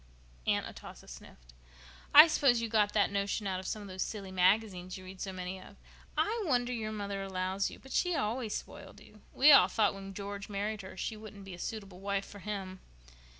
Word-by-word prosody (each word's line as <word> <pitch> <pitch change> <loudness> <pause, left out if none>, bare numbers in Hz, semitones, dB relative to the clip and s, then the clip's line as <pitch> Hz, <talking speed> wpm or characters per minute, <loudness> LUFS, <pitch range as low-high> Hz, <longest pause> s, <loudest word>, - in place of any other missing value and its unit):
Aunt - - +2
Atossa - - -11
sniffed. - - -13 0.6
"I 300 +2 +12
suppose 275 -7 +3
you 230 - -2
got 210 -2 +2
that 205 -2 +3
notion 200 +1 -1
out 190 -1 -1
of 185 - -7
some 215 - -3
of - - -9
those 185 -1 -6
silly 200 -3 -4
magazines 185 0 +1
you 185 - -11
read 185 0 -10
so 195 - -3
many 185 0 -6
of. - - -14 0.4
I 450 +2 +1
wonder 250 -3 +1
your 220 -2 -3
mother 200 -2 -4
allows 190 0 -1
you. - - -11
But 270 - -15
she 360 -1 +2
always 225 -2 -1
spoiled - - -8
you. - - -17
We 295 +3 +6
all 275 - +9
thought 215 -3 +2
when 195 0 -9
George 200 0 -6
married 205 +1 -3
her 190 0 -10
she 220 - -3
wouldn't 210 -2 -11
be 195 - -8
a 175 - -10
suitable 200 -4 -6
wife 200 0 -2
for 205 - -11
him." 190 -2 -5
200 Hz, 210 wpm, -32 LUFS, 190-220 Hz, 0.6 s, I